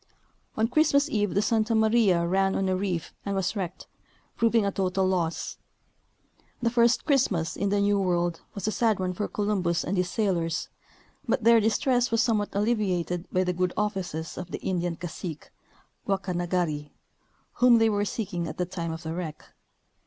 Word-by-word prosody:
On 220 +1 +3
Christmas 285 +2 +3
eve 205 -5 0
the 200 - +3
Santa 225 0 +1
Maria 220 -6 +3
ran 190 +2 +1
on 195 - 0
a 185 - +1
reef 185 -3 -3
and 200 -1 -2
was 195 +2 -1
wrecked, 185 -3 -4 0.5
proving 230 -2 +3
a 200 - +1
total 190 0 0
loss. 175 -3 -1 1.0
The 235 -1 0
first 235 0 +3
Christmas 215 - +1
in 200 - -1
the 205 +1 +1
New 200 0 +2
World 175 -3 0
was 200 0 -4
a - - +1
sad 220 -3 +1
one 185 -1 -1
for 205 +3 -2
Columbus 190 -5 0
and 195 - -2
his 180 0 +1
sailors, 170 -7 -1 0.6
but 230 - 0
their 230 0 +7
distress 245 +3 +2
was 230 - +1
somewhat 220 -3 +1
alleviated 190 -5 0
by 185 - +2
the 180 0 -1
good 180 0 0
offices 190 -6 -3
of 180 -1 -7
the - - -4
Indian 175 -2 -1
cacique, 170 -2 -7 0.6
Guacanagari, 175 -5 -1 0.7
whom 245 -1 +7
they 225 0 +4
were 205 -2 +1
seeking 200 -6 -3
at - - -7
the 180 - 0
time 170 -2 -4
of 160 +1 -6
the 160 - -5
Avreck. 165 -3 -5
195 Hz, 175 wpm, -27 LUFS, 175-220 Hz, 1.0 s, their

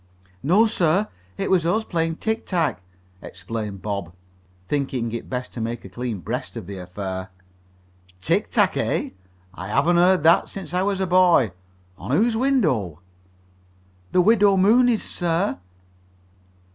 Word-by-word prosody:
"No, 190 +10 +4
sir. 190 -1 +1 0.3
It - - -2
was 180 -3 +3
us, 215 +7 0
playing 165 -2 -1
tic 220 +5 -2
tac," 160 - 0 0.4
explained 100 +2 -6
Bob, 100 -5 -4 0.5
thinking 130 -5 -2
it 115 - -6
best 125 -1 -4
to 120 - -5
make 115 0 -4
a - - -9
clean 115 0 -5
breast 120 +3 -5
of 110 - -7
the 95 +1 -7
affair. 95 +1 -6 0.9
"Tic 95 - 0
tac, - - +2
eh? - - -1 0.4
I - - -7
haven't 170 +5 +2
heard 180 -1 +4
that 165 +1 +4
since 195 -3 -6
I 180 - +1
was 195 0 0
a - - +1
boy. 175 - +4 0.5
On 100 - -8
whose 230 +2 +2
window?" 160 - +1 1.1
"The 180 - +4
Widow 205 0 +4
Mooney's, 230 +4 +4
sir." 175 - -1
160 Hz, 145 wpm, -23 LUFS, -, 1.1 s, No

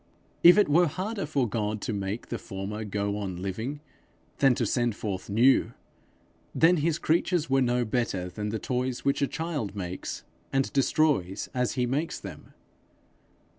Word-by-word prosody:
If 175 +3 +9
it 210 - +5
were 170 +4 +4
harder 195 +4 -3
for 140 -5 +1
God 105 0 -2
to 110 - -2
make 100 +2 -4
the - - -3
former 100 +1 -5
go 100 0 -2
on 95 -4 -4
living, 110 +10 -4 0.6
than 135 -3 +5
to 120 - 0
send 120 +1 0
forth 100 -3 -4
new, 120 +6 +4 0.8
then 170 +2 +5
his 160 +1 +1
creatures 165 -2 +1
were 135 0 +4
no 125 -1 +1
better 110 -6 -1
than 105 +4 -4
the 110 - -2
toys 125 +2 -2
which 140 +1 +1
a 140 - +3
child 150 -11 -3
makes, 90 -2 -5 0.3
and 135 0 0
destroys 135 - +1
as 125 -1 0
he 125 -2 0
makes 145 +7 -2
them. - - -10
125 Hz, 165 wpm, -27 LUFS, 105-145 Hz, 0.8 s, If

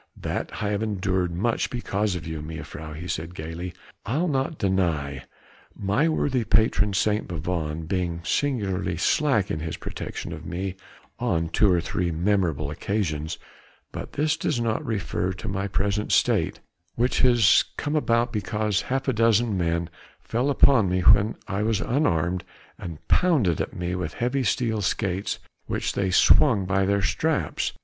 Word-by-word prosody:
"That - - -4
I 105 - 0
have 105 0 -1
endured 95 -4 0
much 105 +7 0
because 105 -5 -1
of 85 - -5
you, 80 -2 -5
mejuffrouw," 80 0 -7
he 85 +3 -7
said 85 +1 -4
gaily, 85 +3 -5 0.3
"I'll 145 - 0
not 140 +1 -1
deny; 85 -9 0 0.5
my 105 +11 +1
worthy 135 -5 +1
patron 105 -2 +2
St. 105 +2 +1
Bavon 80 -2 -3
being 85 -1 -2
singularly 100 - -1
slack 125 - +2
in 80 - -2
his 80 0 -4
protection - - -6
of - - -8
me 95 +2 -4 0.4
on 80 -1 0
two 105 +2 +3
or 90 - +3
three 85 +1 -1
memorable 85 -4 0
occasions; 80 -4 -2 0.5
but - - -7
this 155 +1 +1
does 135 - -1
not 115 -2 0
refer 95 -4 -2
to 90 - -8
my 95 +1 -2
present 100 +1 -1
state, - - +2 0.3
which 125 +2 +1
has 120 -5 +5
come 145 +1 -2
about 120 -4 +1
because 105 -1 0
half 135 +1 -1
a 130 - +2
dozen 115 -1 +3
men 85 -2 0 0.3
fell 125 +5 -1
upon 135 -7 +5
me 90 0 +1
when 100 +5 +5
I 100 -1 -2
was 110 -1 +1
unarmed 90 - 0 0.4
and 85 -4 -8
pounded 130 - +3
at - - -4
me 90 0 -3
with 90 0 -3
heavy 125 +3 0
steel 110 -4 0
skates, 95 0 -1 0.3
which - - -1
they 95 -1 0
swung 100 +2 +5
by 95 0 +1
their 100 0 +1
straps. - - 0
100 Hz, 155 wpm, -25 LUFS, 85-115 Hz, 0.5 s, has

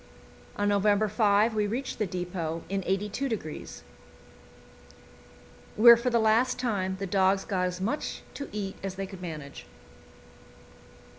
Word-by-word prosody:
On 205 - 0
November 205 +1 +3
5 210 +1 +3
we 210 -1 0
reached 245 +5 -4
the 215 - 0
depot 175 -2 -4
in 195 0 -1
82°, 200 - -3 1.9
where 235 +2 +9
for 235 +2 -1
the 235 - +2
last 230 +3 +3
time 200 -7 -1
the 195 - -4
dogs 190 +1 +2
got 185 -2 0
as 180 0 -5
much 225 +10 -3
to 280 - -7
eat 200 -2 -4
as 195 -1 -5
they 195 0 -4
could 190 -1 -10
manage. 155 -5 -8
200 Hz, 135 wpm, -28 LUFS, 185-220 Hz, 1.9 s, where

